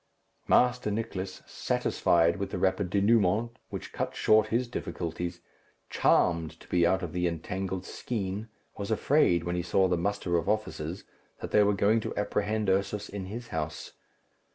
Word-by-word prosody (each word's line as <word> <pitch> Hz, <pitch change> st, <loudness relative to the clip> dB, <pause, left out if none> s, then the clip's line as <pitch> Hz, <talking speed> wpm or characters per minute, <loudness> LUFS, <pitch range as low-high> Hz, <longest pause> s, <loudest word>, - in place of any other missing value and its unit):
Master 125 Hz, -3 st, +3 dB
Nicless, 100 Hz, -3 st, -4 dB
satisfied 85 Hz, 0 st, +1 dB
with 100 Hz, -, -3 dB
the -, -, -4 dB
rapid 95 Hz, +1 st, +1 dB
dénouement 105 Hz, +2 st, +3 dB, 0.2 s
which -, -, -7 dB
cut -, -, -3 dB
short 110 Hz, 0 st, +4 dB
his 120 Hz, +3 st, 0 dB
difficulties, 85 Hz, -5 st, -4 dB, 0.5 s
charmed 85 Hz, -3 st, +2 dB
to -, -, -16 dB
be 85 Hz, -1 st, +3 dB
out 95 Hz, +1 st, +1 dB
of 85 Hz, -, -5 dB
the 90 Hz, 0 st, +1 dB
entangled 90 Hz, +3 st, -3 dB
skein, 105 Hz, -2 st, -4 dB, 0.3 s
was 100 Hz, -, -4 dB
afraid, 110 Hz, -, +3 dB
when 90 Hz, 0 st, -2 dB
he 90 Hz, -, 0 dB
saw 95 Hz, +2 st, +2 dB
the 90 Hz, -1 st, +1 dB
muster 90 Hz, -1 st, 0 dB
of 85 Hz, -, -1 dB
officers, 95 Hz, -5 st, -2 dB, 0.4 s
that -, -, -6 dB
they 105 Hz, -, +5 dB
were 105 Hz, 0 st, +3 dB
going 105 Hz, +4 st, +3 dB
to -, -, -5 dB
apprehend 105 Hz, +1 st, -1 dB
Ursus 100 Hz, +2 st, 0 dB
in 100 Hz, -2 st, -5 dB
his 115 Hz, +5 st, -7 dB
house. 75 Hz, -1 st, -4 dB
95 Hz, 160 wpm, -29 LUFS, 90-105 Hz, 0.5 s, they